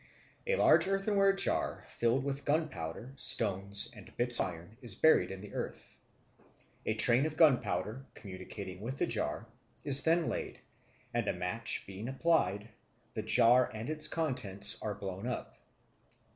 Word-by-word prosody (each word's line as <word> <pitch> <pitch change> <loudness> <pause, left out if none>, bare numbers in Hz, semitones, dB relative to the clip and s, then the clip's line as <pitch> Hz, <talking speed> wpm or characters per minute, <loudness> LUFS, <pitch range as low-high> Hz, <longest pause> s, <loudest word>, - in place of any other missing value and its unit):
A 485 - +2
large 340 - +4
earthenware 195 0 +2
jar 195 - -1
filled 120 +3 0
with 140 0 -3
gunpowder, 130 - -2
stones, 100 -4 0
and - - -13
bits 120 0 +4
of - - +2
iron 85 +4 -10
is 115 -6 -4
buried 160 - +4
in 95 0 -7
the 105 - -11
earth. - - -6 0.9
A 110 - +1
train 120 +6 +4
of 155 0 -8
gunpowder, 135 -5 +2
communicating 95 -1 -8
with 125 +5 -5
the - - +1
jar, 115 0 -3 0.4
is 140 -2 +7
then 165 0 +2
laid; - - -4 0.5
and - - -1
a - - +1
match 90 +5 -2
being 100 +4 -7
applied, 135 -8 +1 0.5
the - - -3
jar 125 +1 +4
and 110 +7 -5
its 155 0 0
contents 125 - 0
are 105 -2 -3
blown 95 +3 -6
up. 125 - -5
120 Hz, 150 wpm, -32 LUFS, 100-150 Hz, 0.9 s, is